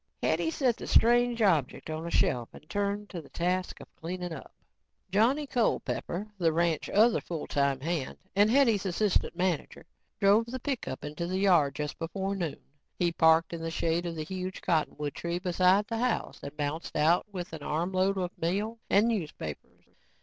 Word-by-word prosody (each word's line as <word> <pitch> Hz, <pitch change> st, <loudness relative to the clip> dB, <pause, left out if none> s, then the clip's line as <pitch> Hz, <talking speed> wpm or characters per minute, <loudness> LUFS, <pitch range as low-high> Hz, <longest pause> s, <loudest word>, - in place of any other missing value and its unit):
Hetty 320 Hz, -, +1 dB
set 260 Hz, -7 st, +1 dB
the -, -, -7 dB
strange 240 Hz, 0 st, +4 dB
object 160 Hz, -10 st, +1 dB
on 160 Hz, +2 st, -4 dB
a -, -, -3 dB
shelf 120 Hz, -7 st, +1 dB
and 150 Hz, -, -14 dB
turned 205 Hz, +2 st, -2 dB
to 175 Hz, -, -5 dB
the 150 Hz, -, -17 dB
task 180 Hz, +2 st, -1 dB
of -, -, -14 dB
cleaning 175 Hz, +1 st, -5 dB
up. -, -, -9 dB, 0.6 s
Johnny 245 Hz, +9 st, +3 dB
Culpepper, 220 Hz, -6 st, -1 dB
the 165 Hz, -2 st, +3 dB
ranch's 170 Hz, +2 st, 0 dB
other 225 Hz, +2 st, +5 dB
full 165 Hz, -3 st, -5 dB
time 140 Hz, -2 st, +1 dB
hand 160 Hz, -3 st, -2 dB, 0.2 s
and 205 Hz, +2 st, +5 dB
Hetty's 230 Hz, -5 st, +4 dB
assistant 190 Hz, 0 st, +1 dB
manager, 175 Hz, -3 st, -2 dB, 0.3 s
drove 210 Hz, +3 st, +4 dB
the 260 Hz, +2 st, -5 dB
pickup 245 Hz, -, -4 dB
into 150 Hz, +4 st, -4 dB
the 185 Hz, +1 st, -1 dB
yard 175 Hz, -8 st, +4 dB
just 150 Hz, -1 st, -4 dB
before 195 Hz, +4 st, -2 dB
noon. 170 Hz, -6 st, -4 dB, 0.3 s
He 175 Hz, -1 st, +2 dB
parked 160 Hz, 0 st, +4 dB
in 170 Hz, -, -5 dB
the 165 Hz, -, -3 dB
shade 165 Hz, +1 st, 0 dB
of 170 Hz, -, -4 dB
the 155 Hz, -, -3 dB
huge 185 Hz, +2 st, -5 dB
cottonwood 150 Hz, -3 st, 0 dB
tree 170 Hz, 0 st, -3 dB
beside 185 Hz, +2 st, +3 dB
the 225 Hz, +1 st, -3 dB
house 250 Hz, 0 st, -1 dB
and 140 Hz, +2 st, -8 dB
bounced 150 Hz, +2 st, -3 dB
out 160 Hz, +5 st, +3 dB
with 180 Hz, -4 st, -6 dB
an 160 Hz, -, -6 dB
armload 185 Hz, +6 st, 0 dB
of 180 Hz, -1 st, -2 dB
mail 205 Hz, +7 st, -1 dB
and 205 Hz, +3 st, +4 dB
newspapers. 160 Hz, -, -4 dB
180 Hz, 180 wpm, -29 LUFS, 160-205 Hz, 0.6 s, other